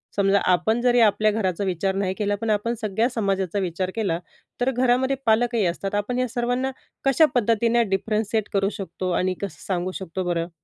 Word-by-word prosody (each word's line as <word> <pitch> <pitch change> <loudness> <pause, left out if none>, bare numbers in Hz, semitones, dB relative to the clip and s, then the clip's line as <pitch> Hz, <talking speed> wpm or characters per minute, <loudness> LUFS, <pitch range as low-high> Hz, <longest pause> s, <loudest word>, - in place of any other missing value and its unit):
समजा 200 0 +3
आपण 220 +6 +2
जरी 245 -1 +3
आपल्या 215 -1 +4
घराचा 200 -3 -1
विचार 190 +1 -1
नाही 195 -1 0
केला, 205 -1 0
पण 225 +2 -4
आपण 215 +3 +1
सगळ्या 215 +3 +1
समाजाचा 195 -4 -1
विचार 185 0 -2
केला 185 -7 0 0.4
तर 260 +2 +2
घरामध्ये 255 +2 +2
पालकही 230 -1 +2
असतात. 195 +4 -2
आपण 245 +5 -1
या 255 - +1
सर्वांना 245 +3 -1 0.3
कशा 275 +4 +5
पद्धतीने 230 +1 +3
डिफरन्सिएट 215 +2 -1
करू 195 0 +2
शकतो 185 -1 -4
आणि 185 +1 +1
कसं 180 -7 -6
सांगू 185 -1 -1
शकतो 185 0 -4
बरं? 170 -1 -1
205 Hz, 175 wpm, -24 LUFS, 190-235 Hz, 0.4 s, कशा